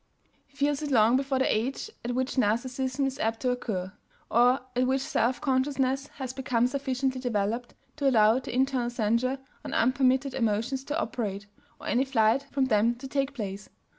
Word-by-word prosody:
He 280 - -26
feels 285 0 +1
it 300 - -3
long 230 -2 +5
before 270 0 0
the 260 - +2
age 260 - -2
at 240 +1 -2
which 260 +1 -1
Narcissism 255 +3 0
is 270 0 -3
apt 225 0 0
to 255 - +1
occur, 190 -7 -3 0.4
or 245 +3 +4
at 255 +1 +2
which 265 +1 +1
self 255 -3 0
consciousness 270 0 0
has 260 -2 -5
become 255 -3 +1
sufficiently 260 0 -1
developed 230 0 -2 0.2
to 280 -2 +3
allow 220 -1 +5
the 265 - -7
internal 255 -1 +1
censure 240 +3 0 0.3
on - - -5
unpermitted 260 +2 +2
emotions 230 +3 0
to 300 +2 -2
operate, 205 -9 -3 0.3
or - - -11
any 250 - +2
flight 265 +1 +2
from 275 -2 +1
them 230 0 +2
to 260 +3 -8
take 275 +1 -1
place. 200 -4 -5
255 Hz, 175 wpm, -28 LUFS, 230-270 Hz, 0.4 s, long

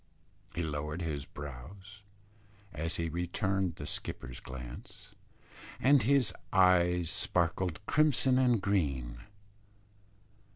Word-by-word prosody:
He 85 - -1
lowered 75 +2 -3
his 75 -4 -3
brows 90 +9 -10 0.7
as 80 +2 -2
he 85 - -1
returned 90 +2 -1
the 75 - -7
skipper's 65 -3 -4
glance, 65 -2 -10 0.7
and 140 0 +5
his 130 0 +3 0.2
eyes 90 -2 +4
sparkled 85 0 0
crimson 135 -3 +4
and 125 -3 +3
green. 70 -12 0
85 Hz, 95 wpm, -31 LUFS, 75-100 Hz, 0.7 s, and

